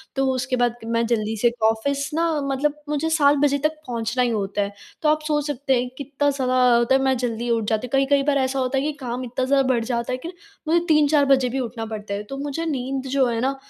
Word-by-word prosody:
तो 270 - +1
उसके 255 0 -1
बाद 245 -1 +1
मैं 230 0 0
जल्दी 220 -2 0
से 240 -1 +4 0.2
ऑफ़िस 275 +5 -1
ना 335 +2 +1 0.2
मतलब 275 +2 0 0.2
मुझे 300 +2 0
7 290 -3 +4
बजे 285 0 +2
तक - - -6 0.2
पहुँचना 235 +1 -1
ही 245 - +1
होता 205 -2 -1
है। 200 0 -2 0.3
तो 305 - +3
आप 310 - +3
सोच 295 -1 0
सकते 280 -1 -1
हैं 250 - -4
कितना 285 +1 -1
ज़्यादा 260 -2 -1 0.2
होता 235 +3 +3
है 270 - +2
मैं 265 -1 +2
जल्दी 240 -1 -3
उठ 230 -1 +1
जाती 220 +2 -1
हूँ। - - -19
कई-कई 275 +1 +3
बार 285 -1 +2
ऐसा 265 0 0
होता 260 +1 0
है 270 - +1
कि 305 - 0
काम 250 +1 -4
इतना 250 +1 -2
ज़्यादा 275 0 +3
बढ़ 230 -1 0
जाता 235 0 -2
है, 255 - -1
कि 325 - -7 0.4
मुझे 335 +2 +4
3-4 300 -2 +4
बजे 265 -2 +3
भी 265 +2 -2
उठना 230 -2 -4
पड़ता 215 -2 -6
है। 205 +1 -3
तो 275 - -5
मुझे 290 +4 -3
नींद 270 -2 -3
जो 275 -1 +3
है 230 -1 -1
ना, 270 +2 0
265 Hz, 250 wpm, -22 LUFS, 235-280 Hz, 0.4 s, से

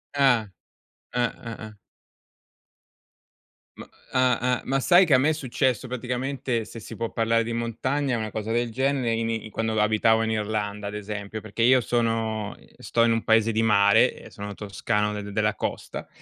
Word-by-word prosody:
Ah. 130 -6 +3 0.7
Eh, 125 - +1
eh, 115 -2 -6
eh. 110 0 -9 2.0
Ma - - -11 0.2
ah-ah, 125 -1 +2
ma 135 +1 +1
sai 175 +7 +6
che 155 -7 +4
a - - +6
me 135 +4 +3
è - - +2
successo 130 -4 -1
praticamente, 125 -1 -2
se 115 - -10
si 115 +1 -9
può 115 +1 -3
parlare 115 0 +1
di 115 +1 -4
montagna, 125 +3 -1
una 110 -1 -3
cosa 110 +1 -4
del 120 +1 0
genere 130 -1 0
in 115 0 -1
i 110 -1 -4
quando 110 0 -1
abitavo 110 +1 +3
in 110 - 0
Irlanda, 105 -1 -2
ad 100 - -5
esempio, 105 0 -5
perché 110 +2 -3
io 130 +1 +5
sono 115 -3 -1 0.2
sto 115 - +1
in 115 - +4
un 115 - -1
paese 110 0 +3
di 110 +1 +1
mare 100 -2 +5
e - - -13
sono 100 0 -7
toscano 105 +1 -1
de 105 0 -7
della 105 +1 +1
costa - - -5
115 Hz, 175 wpm, -25 LUFS, 110-125 Hz, 2.0 s, sai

